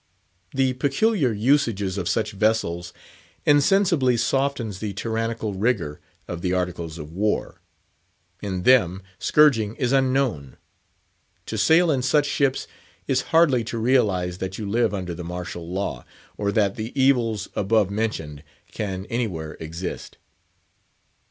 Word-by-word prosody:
The 130 -1 +1
peculiar 145 - +1
usages 110 -4 +1
of 90 - -2
such 110 -1 0
vessels 95 -5 0 0.5
insensibly 145 -3 +4
softens 120 -4 -1
the 105 -1 -4
tyrannical 115 0 -2
rigour 95 -7 -1 0.3
of 85 -1 -5
the 90 0 0
Articles 85 -3 -3
of 75 -1 -8
War; 105 +5 -2 0.8
in 95 -3 -3
them, 95 -6 +4 0.2
scourging 115 -8 +3
is 125 -2 -1
unknown. 130 - +1 0.9
To - - -5
sail 165 +1 +4
in 135 -3 +1
such 145 +3 +2
ships 140 -2 0 0.4
is 130 -1 +1
hardly 155 -8 +4
to 115 +1 -4
realise 105 -8 +1
that 95 0 -5
you 105 - -4
live 115 +1 +1
under 90 -4 -4
the 85 +1 -7
martial 85 -1 -6
law, 90 -10 -3 0.3
or 100 -1 -1
that 100 -1 +1
the 115 +5 -5
evils 120 -6 +2
above 105 -1 +2
mentioned 80 -9 -3 0.3
can 95 -3 -4
anywhere 95 -10 -3
exist. 80 +3 -6
110 Hz, 130 wpm, -23 LUFS, 90-130 Hz, 0.9 s, insensibly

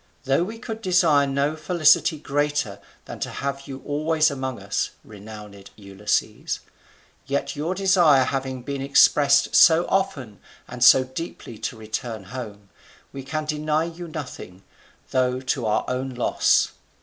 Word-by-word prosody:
Though 135 +4 +2
we 220 +5 -6
could 225 -2 -7
desire 170 -7 +3
no 140 +2 0
felicity 155 -1 +3
greater 145 -6 -2 0.3
than - - -9
to - - -3
have 140 0 -5
you 135 -1 -8
always 155 +1 +1
among 130 -3 -4
us, 100 +1 -2
renowned 105 -1 -12
Ulysses, 100 0 -3 0.7
yet 140 +2 -2
your 160 +6 -2
desire 175 -8 +4
having 130 -1 -3
been 140 +1 -4
expressed 140 +1 +4
so 165 +1 +6
often 140 - -2 0.3
and 125 -1 -3
so 130 - +8
deeply 130 -4 -8
to 115 - -4
return 110 0 -5
home, 105 -6 -8 0.4
we 135 - -6
can 155 +3 -4
deny 155 +1 0
you 170 +1 -7
nothing, 125 - -8 0.5
though 130 -1 +1
to 130 -2 -2
our 105 - 0
own 130 +1 -2
loss. 120 - +2
140 Hz, 140 wpm, -23 LUFS, 125-155 Hz, 0.7 s, so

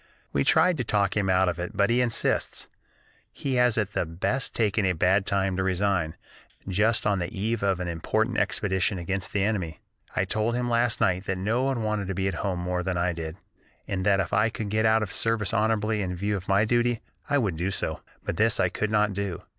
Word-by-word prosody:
We 70 - +2
tried 165 - +4
to 125 - -1
talk 100 -3 +1
him 100 -2 +1
out 95 0 +3
of 85 -1 -1
it, 95 +4 -5
but 100 +3 +3
he 125 +1 +3
insists. 120 -2 -1 0.6
He 135 - -3
has 125 -1 +3
at 105 -2 -1
the - - +1
best 90 +11 -2
taken 110 -2 +1
a 95 -1 +2
bad 95 +4 +2
time 95 -1 +1
to 95 - +1
resign, 95 -3 0 0.5
just 110 +4 +2
on 100 -1 +2
the 85 0 -2
eve 110 +3 -2
of 95 -2 +1
an 90 - -3
important 85 -1 0
expedition 95 0 0
against 90 +1 -3
the 100 - +1
enemy. 95 -7 -1 0.4
I - - +1
told 110 +2 0
him 125 0 -1
last 120 -1 +1
night 95 +1 +2
that 95 -1 -2
no 110 +7 0
one 130 -3 0
wanted 105 -2 -1
to 95 - -3
be 95 +1 0
at 95 - -1
home 95 -3 -1
more 90 0 -1
than 90 0 -2
I 85 +1 +1
did, 80 0 -6 0.5
and 95 -1 -2
that 100 0 +3
if 95 - -2
I 105 +3 +3
could 110 -2 -5
get 110 +1 +2
out 110 0 +3
of 105 - -4
the - - -8
service 115 -1 0
honorably 110 -1 +1
in 90 -2 -2
view 100 +3 -1
of 95 -1 -6
my 100 +2 +3
duty, 120 0 +1 0.3
I 145 - +3
would 105 -10 0
do 90 +4 -1
so, 100 - -3 0.2
but - - -3
this 110 +1 +3
I 90 - +3
could 110 +3 -2
not 105 -1 +2
do. 100 -3 -4
100 Hz, 235 wpm, -26 LUFS, 95-110 Hz, 0.6 s, tried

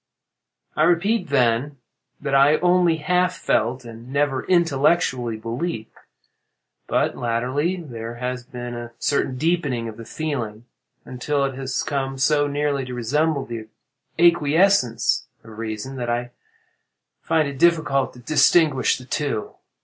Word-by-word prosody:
"I - - 0
repeat, 175 +6 +2
then, 130 +1 +1 0.4
that 140 -1 -3
I 140 +3 +5
only 175 -1 +3
half 180 +3 +1
felt, 120 +3 0
and 115 +2 -11
never 140 -2 0
intellectually 145 -8 +2
believed. 115 +2 -4 1.0
But - - +1
latterly 125 +9 -1
there 120 -9 -7
has 125 +1 -4
been 120 -1 -7
a 120 0 -7
certain 135 -2 0
deepening 145 -7 0
of 110 -1 -8
the 115 - -9
feeling, 120 -9 -4 0.4
until 140 +3 -1
it 135 - -3
has 130 0 -3
come 135 -2 -2
so 145 +2 +2
nearly 145 -1 -1
to 125 -1 -6
resemble 140 +5 0
the 115 -2 -7 0.5
acquiescence 170 - +3 0.2
of 110 -1 -12
reason, 115 +4 -5
that 120 -1 -3
I 120 +1 -2 0.9
find 155 -2 +1
it 140 -2 -7
difficult 160 -6 +2
to 125 - -14
distinguish 145 0 +3
between 125 - -12
the - - -28 0.2
two. 105 - -6
135 Hz, 135 wpm, -22 LUFS, 120-155 Hz, 1.0 s, I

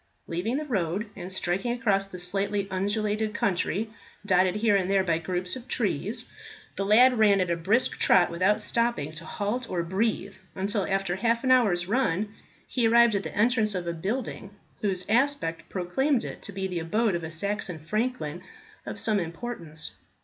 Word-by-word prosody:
Leaving 190 +10 -2
the 305 - -3
road, 205 - -2
and 180 - -7
striking 190 +5 0
across 205 -6 +1
the 185 - -9
slightly 195 +2 -1
undulated 210 +3 -1
country 200 +2 0 0.3
dotted 185 -1 +3
here 210 -1 +3
and 190 -1 +1
there 195 -1 +3
by 165 -3 +1
groups 180 +3 -3
of 255 -1 -9
trees, - - -1 0.5
the 195 - -1
lad 240 +4 +6
ran 205 -2 +5
at 180 -2 +1
a - - +2
brisk 200 +9 +1
trot, 180 -2 +5
without 185 +5 +2
stopping 230 -11 0
to 155 +1 -8
halt 230 +5 -3
or 175 -2 -1
breathe, 200 +2 -1 0.2
until 200 +1 0
after 195 -2 0
half 230 +3 +1
an 260 - +2
hour's 200 -9 +4
run 210 -3 0 0.3
he 240 -3 +1
arrived 235 0 +6
at 200 - +1
the 160 -2 -7
entrance 220 -2 +2
of 180 -1 -2
a 170 - -2
building, 200 +4 -4 0.3
whose 190 -3 -1
aspect 235 -8 0
proclaimed 235 +9 0
it - - -7
to 200 - -5
be 190 0 -3
the 180 -2 -2
abode 210 +6 +1
of 170 -1 -2
a 160 - -5
Saxon 190 +1 -2
franklin 180 -1 -2 0.5
of - - -5
some 215 -2 +1
importance. 170 -3 -5
200 Hz, 180 wpm, -27 LUFS, 180-225 Hz, 0.5 s, lad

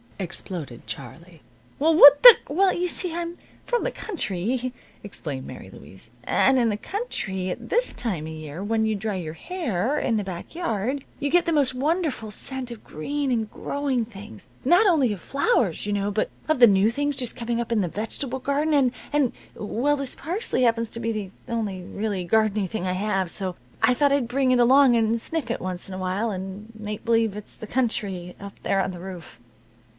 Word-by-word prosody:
exploded 175 - -6
Charlie. 145 +8 -8 0.4
"Well, 320 +3 +4
what 285 -2 +10
the - - +12
" - - -23
"Well, 370 +6 +3
you 360 +1 0
see. 350 0 -2
I'm 340 0 -4 0.3
from 485 -1 0
the - - -1
country," 250 - -3 0.3
explained 145 -9 -6
Mary - - -9
Louise, 95 +10 -12
"and 265 - +3
in 235 -2 +3
the 210 - -1
country, 210 - -3
at 235 +5 -6
this 485 +3 +1
time 190 -10 -3
of 160 - -6
year, 155 +3 -7
when 220 +1 +1
you 220 -1 +1
dry 210 0 -3
your 165 -4 -4
hair 260 - -2
in 225 - +1
the 210 - -1
back 180 -3 -7
yard, 265 - -2
you 285 - -1
get 350 +3 +3
the 335 - 0
most 280 -5 +2
wonderful 290 -4 -1
scent 260 +3 -4
of 235 -2 -9
green 280 - -3
and 225 -3 0
growing 275 -5 -1
things 195 - -11 0.2
not 355 +9 +5
only 290 - +3
of 190 - -8
flowers, 280 - +1
you 205 - 0
know, 200 0 0
but 215 +1 0 0.2
of 310 -4 +1
the 240 - +9
new 200 +1 +4
things 290 +3 -1
just 250 -3 -4
coming 235 -1 -2
up 235 0 -3
in 225 -3 +2
the 180 - 0
vegetable 240 - -4
garden, 285 +4 0
and 270 -4 +4 0.2
and 290 -4 +2 0.2
well, 245 +7 0
this 275 -2 -3
parsley 340 - -1
happens 230 -1 +2
to 230 - -5
be 230 0 -1
the 210 -4 -4 0.2
only 215 -6 -2
really 200 +1 -3
gardeny 215 +1 +2
thing 185 -1 -4
I 180 - 0
have, 195 -1 0
so 185 0 -4 0.3
I 250 +3 +5
thought 285 +1 +3
I'd 280 -4 +2
bring 260 +1 +1
it 250 - +4
along 260 +1 +6
and 225 0 +2
sniff 310 0 -4
it 235 - -2
once 185 -1 -4
in 195 - -8
a - - -5
while, 190 +5 -1
and 195 +3 -6
make 210 0 -6
believe 225 -3 +2
it's 210 0 -9
the 220 - -8
country, 205 -8 -2
up 200 0 -8
there 195 0 +2
on 190 - -2
the 180 - -8
roof." 180 -7 -9
225 Hz, 205 wpm, -24 LUFS, 195-275 Hz, 0.4 s, the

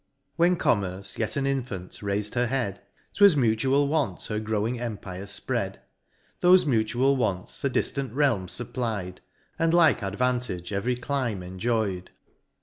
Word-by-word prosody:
When 175 +2 +4
Commerce, 100 - -1
yet 110 +4 -1
an 135 - 0
infant, 125 -10 -3
rais'd 105 +1 -1
her 120 0 +1
head, 120 -6 -2 0.3
'Twas 200 -6 +6
mutual 130 +4 +2
want 150 -2 -1
her 105 -1 -2
growing 110 +2 -1
empire 100 -5 -5
fpread: 100 - -2 0.7
Thofe 180 0 +6
mutual 125 +1 +2
wants 95 -8 -2
a 140 - +2
diflant 135 +1 -1
realm 120 -11 +2
fupply'd, 95 -1 -3 0.4
And 165 +1 +3
like 165 -7 +5
advantage 105 -3 -2
every 115 +6 0
clime 120 -6 -2
enjoy'd. 95 0 -2
115 Hz, 135 wpm, -26 LUFS, 100-135 Hz, 0.7 s, Twas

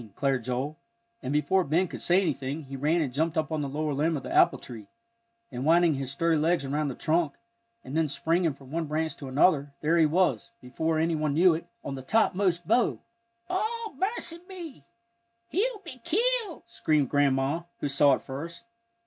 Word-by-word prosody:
declared 135 -3 0
Joel, 130 +5 -3 0.4
and 130 - -4
before 180 +6 +2
Ben 170 +5 +1
could - - -8
say 180 +2 +4
anything 145 -4 -2
he 135 0 -8
ran 155 +5 +1
and 135 -5 -2
jumped 160 +3 0
up 155 0 0
on 155 -1 -1
the 140 - -3
lower 150 +1 -2
limb 155 +3 +1
of 135 - -7
the - - -5
apple - - +5
tree, 110 -5 -10 0.6
and 125 0 -4
winding 165 +2 +4
his 135 -2 -4
sturdy 160 +3 +1
legs 165 -1 +1
around 145 +2 -1
the 135 - -4
trunk, 160 -2 +1 0.5
and 135 - -7
then 160 -1 +2
springing 165 +2 0
from 135 -1 -15
one 165 +1 -1
branch 155 0 -2
to 140 - -8
another, 140 +1 +2
there 165 +3 +2
he 160 - +5
was, 155 - +1
before 160 +6 -2
any 165 +1 +1
one 155 -2 0
knew 175 +2 +6
it, 165 +2 -5 0.2
on 140 - -4
the 135 - -6
topmost 180 0 +1
bough! 245 - +3 0.5
"O 440 +3 -2
mercy 375 - -1
me 335 - -9 0.7
he'll 430 +3 -1
be 255 -7 -10
killed!" 445 +1 0
screamed 155 - 0
Grandma, 140 +2 +2 0.2
who - - 0
saw 140 0 +4
it - - -10
first. 160 +9 -7
155 Hz, 190 wpm, -27 LUFS, 140-175 Hz, 0.7 s, knew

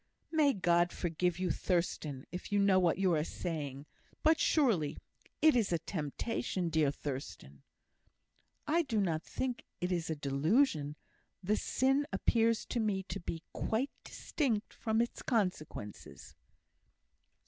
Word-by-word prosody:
"May 305 -4 +4
God 175 -2 +3
forgive 175 0 -1
you, 180 -2 0
Thurstan! 155 -6 -1
if 180 +3 -6
you 205 - +2
know 200 -2 +5
what 175 -3 +2
you 190 -2 +3
are 150 -2 +2
saying. 145 -5 -4 0.4
But, 315 0 +5
surely, 220 - +2 0.5
it 315 -3 +7
is 225 -6 +2
a 170 - +3
temptation, 175 - -2
dear 155 -3 +3
Thurstan." 130 - -6 1.0
"I 330 +3 +3
do 235 -9 -1
not 165 -6 +1
think 250 +6 -3 0.2
it 180 +1 -1
is 170 -2 -1
a 160 - 0
delusion. 150 - +1 0.5
The 205 +4 +2
sin 270 +5 +1
appears 230 -1 +2
to 240 - -2
me 205 -4 0
to 195 - -3
be 165 -2 -5
quite 245 +6 -1
distinct 235 -8 -2
from 220 0 0
its 235 - -6
consequences." 155 - -3
180 Hz, 135 wpm, -33 LUFS, 155-230 Hz, 1.0 s, it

